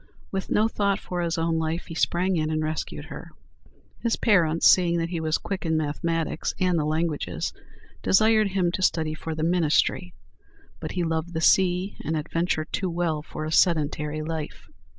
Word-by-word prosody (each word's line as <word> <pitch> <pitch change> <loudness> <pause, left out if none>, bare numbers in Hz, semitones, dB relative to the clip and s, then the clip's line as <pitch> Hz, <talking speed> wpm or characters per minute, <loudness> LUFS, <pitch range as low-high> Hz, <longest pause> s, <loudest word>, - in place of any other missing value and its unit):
With 195 -1 -3
no 215 +1 +3
thought 200 -3 0
for 180 -1 -4
his 170 0 -1
own 165 0 0
life, 160 +2 -2
he 165 - -8
sprang 180 +3 +1
in 155 -2 0
and 155 0 -1
rescued 155 0 -4
her. - - -9 0.7
His 235 -1 +1
parents, 170 -7 +3
seeing 175 -2 +5
that 165 0 -1
he 170 -2 -3
was 160 -1 0
quick 195 -2 -5
in 160 -2 +1
mathematics 160 +2 -2
and 180 -3 +2
the 150 - 0
languages, 155 - -2 0.5
desired 215 +1 +4
him 190 -3 0
to 185 - -3
study 160 -4 +1
for 160 +1 -5
the 155 - -3
ministry; 160 - +1 0.6
but - - -5
he 180 - -1
loved 165 +1 -2
the - - 0
sea 185 +2 +3
and 160 +1 -1
adventure 155 +1 -1
too 185 +3 -2
well 165 -3 -1
for 155 0 -6
a 155 - -4
sedentary 155 -2 +1
life. 155 -1 -5
165 Hz, 180 wpm, -25 LUFS, 155-180 Hz, 0.7 s, seeing